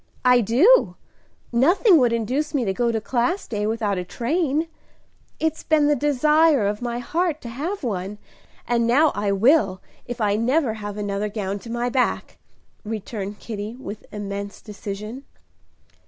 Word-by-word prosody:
"I 250 -1 +6
do! 290 - +4 0.6
Nothing 335 - +5
would 245 -3 +3
induce 255 +7 -1
me 255 -4 +1
to 195 - 0
go 235 +3 +1
to 225 - -1
Class 255 - -1
Day 210 -2 -2
without 215 -4 -1
a - - -3
train. 300 - -1 0.7
It's 320 0 -1
been 310 -2 +3
the 295 0 +3
desire 295 -2 +3
of 205 +2 -1
my 240 -1 -2
heart 320 +6 -1
to 235 - -7
have 315 - -4
one, 200 -3 -3 0.5
and 235 -1 +1
now 285 +6 +4
I 205 0 -1
will, 200 -2 +3 0.3
if 245 0 -5
I 205 -2 +1
never 250 +2 +1
have 205 -1 -6
another 205 0 -2
gown 200 -1 -3
to 230 - -11
my 240 +1 -1
back!" 250 0 -1 0.4
returned 210 -1 -5
Kitty, 215 0 -6
with 215 -5 -8
immense 200 -1 -5
decision. 210 +4 -7
235 Hz, 155 wpm, -23 LUFS, 210-285 Hz, 0.7 s, I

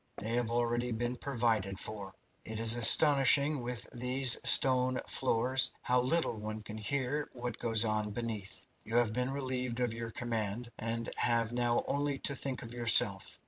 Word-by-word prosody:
They 110 - -7
have 120 -1 -2
already 120 +1 -3
been 120 +2 -4
provided 115 -7 -3
for. 100 -3 -6 0.3
It 110 0 -8
is 115 0 +7
astonishing 140 +3 +6
with 120 0 -5
these 125 +1 +4
stone 130 -1 +5
floors 130 +1 0
how 125 0 0
little 130 -3 -3
one 110 0 -8
can 110 +1 -9
hear 140 +5 -4
what 120 -2 -8
goes 115 -1 +1
on 110 -1 -3
beneath. 110 -3 -7 0.2
You 115 - -7
have 120 -2 0
been 125 +2 -3
relieved 130 -3 -5
of 120 -2 -3
your 115 0 -8
command, 115 0 -5
and 115 +1 -5
have 115 -1 0
now 120 -1 -2
only 145 0 -3
to 140 - -1
think 130 -1 -6
of 115 0 -11
yourself. 115 -4 +3
120 Hz, 165 wpm, -29 LUFS, 115-125 Hz, 0.3 s, is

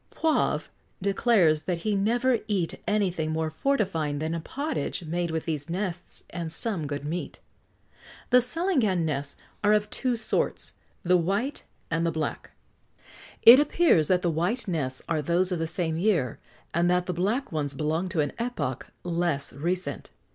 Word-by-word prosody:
Poivre 320 -1 +1 0.3
declares 195 -5 +3
that 170 0 -3
he 210 -1 +2
never 235 +4 +2
eat 190 -6 0
anything 185 -7 0
more 160 0 -1
fortifying 165 - 0
than 160 +2 -2
a 170 - -2
pottage 280 - -3
made 170 +2 -1
with 160 -1 -2
these 155 -1 -3
nests 180 0 -4
and 170 -3 -4
some 170 -3 -1
good 145 0 -4
meat. 165 +4 -4 0.9
The 250 - +8
salangan 250 - +1
nests 145 -2 -2 0.3
are 210 +1 +5
of 210 0 +1
two 255 -2 0
sorts 225 - -2 0.3
the 180 +1 +4
white 200 - -1 0.3
and 165 0 +1
the 170 - +1
black. 160 -1 -3 0.9
It 240 +4 +11
appears 295 - +3
that 180 -1 +2
the 175 - +2
white 180 +11 0
nests 140 -8 -2
are 160 -2 0
those 175 +5 +1
of 180 - -1
the 165 - -1
same 160 -1 -1
year, 170 - +1 0.3
and 170 +1 +2
that 180 0 +2
the 180 - -2
black 205 - -1
ones 145 -3 -2
belong 160 +5 -1
to 165 -3 +1
an 145 - -2
epoch 155 - -3 0.2
less 170 -4 -1
recent. 175 +6 -3
175 Hz, 160 wpm, -27 LUFS, 160-210 Hz, 0.9 s, It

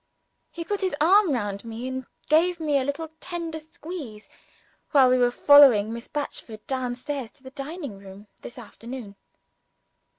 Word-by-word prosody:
He 335 - -6
put 410 +4 -3
his 375 -5 0
arm 370 +3 +5
round 205 -6 -2
me, 230 +2 -6
and 260 -1 -5 0.2
gave 340 +3 +3
me 295 -3 +1
a - - -1
little 285 +4 -4
tender 335 -2 -5
squeeze, 310 -8 -9 0.6
while 265 -4 +5
we 255 - +3
were 245 0 +4
following 245 -5 +6
Miss 235 +1 -7
Batchford 230 -7 -6
down 255 -2 -2
to 270 0 -6
the 260 - -10
dining 285 - -7
room 195 +1 -12 0.2
this 240 - -10
afternoon. 235 -2 -9
265 Hz, 155 wpm, -25 LUFS, 235-315 Hz, 0.6 s, following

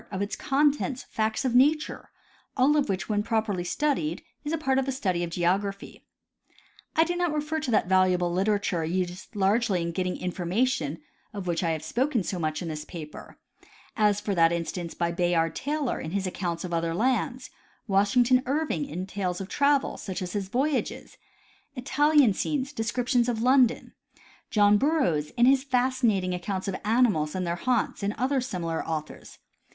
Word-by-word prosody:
of 190 - -4
its 200 +1 -2
con 290 +1 +3
tents, 275 -2 -4
facts 220 +4 -1
of 250 - +1
nature, 295 +5 +2 0.5
all 270 +4 +4
of 290 -6 +1
which 190 -1 -2
when 210 -1 +1
properly 215 -4 -1
studied, 180 - -1 0.2
is 295 - -3
a 330 - 0
part 270 -3 +1
of 265 - -2
the - - 0
study 185 -9 -1
of 170 - -3
geography. 195 +4 -2 0.9
I 320 - +5
do 350 +1 -2
not 350 -2 0
refer 305 +1 -2
to 305 - -4
that 220 - +3
valuable 185 -2 +3
literature 195 -2 0
used 180 +5 -3
largely 200 0 +2
in 170 0 -2
getting 180 +1 -2
information, 180 - -1 0.3
of 200 -2 -5
wdiich 170 -2 -1
I 170 - 0
have 160 -1 -2
spoken 245 - 0
so 180 0 -3
much 155 +1 -2
in - - -5
this 155 -2 -4
paper, 155 -1 -10 0.6
a^ 210 -2 +2
that 170 -5 +4
for 170 - 0
instance, 170 0 -4
by 170 0 0
Bayard 170 -2 +1
Taylor, 290 -2 -2
in 155 - -5
his 195 +2 -2
account 175 -2 -3
of 180 -2 -5
other 165 0 -1
lands; 250 +3 -1 0.4
Washington 235 +6 +3
Irving, 300 +1 -1
in 185 -5 -4
tales 190 -2 -3
of 195 0 -6
travel, 285 -1 +2
such 190 -1 -5
as 180 - -6
his 200 -2 -2
voyages, 270 +5 -2 0.6
Italian 290 -1 +3
scenes, 280 +6 -2
description 245 +1 0
of 230 -1 -1
London; 255 -1 +3 0.6
John 205 -1 +4
Burroughs, 185 - +1
in 240 - +5
his 265 +1 +4
fascinating 245 -8 +1
accounts 185 +2 -3
of 195 - -2
animals 210 -9 +2
and 185 -1 -1
their 170 0 -1
haunts, 245 +6 -1
and 200 +1 -1
other 265 +1 +1
similar 170 -9 -3
authors. 155 -2 -6
205 Hz, 175 wpm, -27 LUFS, 180-260 Hz, 0.9 s, I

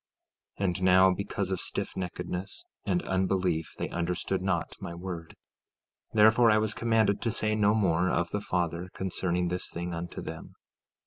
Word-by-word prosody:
15:18 100 - +1
And 90 -1 -1
now, 95 0 +6
because 100 0 -3
of 95 - 0
stiffneckedness 90 - -4 0.2
and 180 - +1
unbelief 95 -3 0
they - - -2
understood 90 +2 -1
not 90 -3 -1
my 85 - -5
word; 85 -2 -6 0.8
therefore 110 +2 +6
I 105 - +5
was 110 0 +1
commanded 110 -3 +2
to 115 - 0
say 110 0 0
no 105 0 +3
more 90 -4 +2
of 85 0 0
the 105 - -1
Father 90 -1 -2
concerning 90 -1 -1
this 90 +1 -2
thing 85 +1 -4
unto 85 +1 -5
them. - - -8
95 Hz, 155 wpm, -29 LUFS, 85-105 Hz, 0.8 s, now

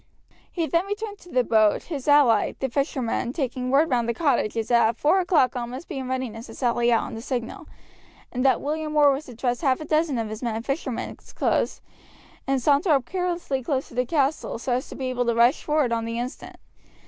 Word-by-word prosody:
He 335 -3 -1
then 335 +5 0
returned 410 0 -5
to 355 - -16
the 255 -6 +2
boat, 215 -3 +3
his 290 -5 -6
ally, 280 -7 +4
the 265 - -1
fisherman, 255 -2 -1
taking 255 -4 -2
word 285 +4 +3
round 240 -2 +1
to 235 - -1
the - - -18
cottages 230 -8 0
that 235 -2 +5
at 230 - -4
four 310 +9 +3
o'clock 330 -9 +2
all 240 -1 -3
must 255 +7 -8
be 295 -6 -5
in 260 - -5
readiness 250 -3 -4
to - - -11
sally 240 -1 +1
out 230 - +3
on - - -7
the 225 - -6
signal, 240 -1 -4 0.6
and 250 0 -2
that 270 - +3
William 305 +1 -3
Orr 290 -1 +6
was 275 +3 -3
to 245 - -11
dress 245 +1 -1
half 265 -5 +2
a 310 - -6
dozen 305 -3 +1
of 225 -2 -2
his 215 - -6
men 235 -3 -2
in 225 - -4
fishermen's 275 -2 -4
clothes - - 0 0.7
and 270 0 +2
saunter 285 +7 +2
up 270 -4 +2
carelessly 350 -5 -2
close 265 +1 -2
to - - -15
the 250 +1 +1
castle, 285 -3 0
so 250 +2 -4
as 250 +2 -2
to - - -8
be 265 - -4
able 245 -1 -1
to 235 - +2
rush 240 +5 +4
forward 300 -5 +1
on 230 -1 -1
the 230 0 -3
instant. 245 +2 -6
260 Hz, 230 wpm, -24 LUFS, 235-300 Hz, 0.7 s, Orr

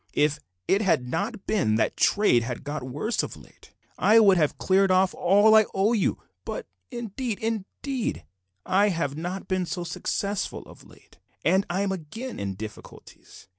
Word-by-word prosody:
If 150 0 +2 0.3
it 195 - +3
had 165 -11 +1
not 200 - -3
been 165 - +1
that 110 - +1
trade 205 - +3
has 120 0 -5
got 145 +1 -5
worse 145 - -2
of - - -6
late, - - -18 0.3
I 215 +2 +5
would 200 -4 +6
have 155 -4 +1
cleared 195 +1 +3
off 185 0 +3
all 205 +4 +4
I 220 -1 +7
owe 200 +4 +2
you, 210 -5 +1 0.3
but - - -5 0.2
indeed, 240 -1 -4
indeed 225 - -3 0.4
I 200 +2 +3
have 165 -6 -2
not 175 +4 -5
been 185 -2 -1
so 175 0 -3
successful 200 +3 -3
of - - -15
late, - - -20 0.3
and 190 +5 +3
I'm 195 +2 0
again 190 - -6
in 100 -1 -3
difficulties. 105 -1 -11
190 Hz, 165 wpm, -26 LUFS, 155-215 Hz, 0.4 s, I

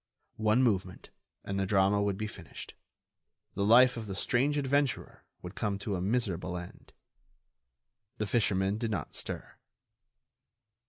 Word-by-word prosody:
One 110 +4 +4
movement, 95 -6 -1 0.3
and 100 0 -3
the 95 - 0
drama 100 +1 +3
would 100 -1 0
be 110 - -2
finished; 95 -5 -9 0.8
the 100 - -1
life 125 +4 +6
of 110 -2 -5
the 95 - -4
strange 135 +8 +1
adventurer 140 -1 0 0.2
would 90 +1 -7
come 100 -2 -1
to 100 0 -3
a 90 - -3
miserable 95 -4 -1
end. 90 0 -10 1.3
The 105 - -1
fisherman 100 -1 +1
did 115 -1 -1
not 105 - -3
stir. - - -6
100 Hz, 140 wpm, -30 LUFS, 95-120 Hz, 1.3 s, life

